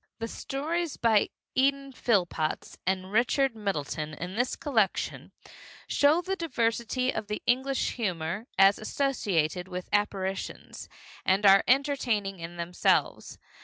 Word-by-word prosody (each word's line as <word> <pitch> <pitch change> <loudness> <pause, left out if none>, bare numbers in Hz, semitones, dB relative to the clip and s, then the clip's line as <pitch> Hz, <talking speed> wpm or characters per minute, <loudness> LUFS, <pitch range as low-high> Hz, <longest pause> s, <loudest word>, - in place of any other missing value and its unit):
The 230 - -4
stories 315 +7 -3
by 220 -3 +3 0.2
Eden 275 +1 +1
Phillpotts 180 -11 -1
and 185 0 -1
Richard 245 +3 +2
Middleton 155 -7 -3
in 180 +4 -6
this 245 +3 0
collection 225 -10 -1 0.5
show 300 +5 +3
the 385 +1 -2
diversity 250 - -1
of 210 - -4
the 210 0 -4
English 265 +2 +1
humor 190 -1 -3
as 195 +1 +6
associated 190 - -1
with 180 -1 -6
apparitions, 195 -2 -2 0.3
and 195 +2 +2
are 195 0 +7
entertaining 245 -8 +1
in 170 +1 -8
themselves. 170 +1 0
215 Hz, 120 wpm, -28 LUFS, 185-265 Hz, 0.5 s, are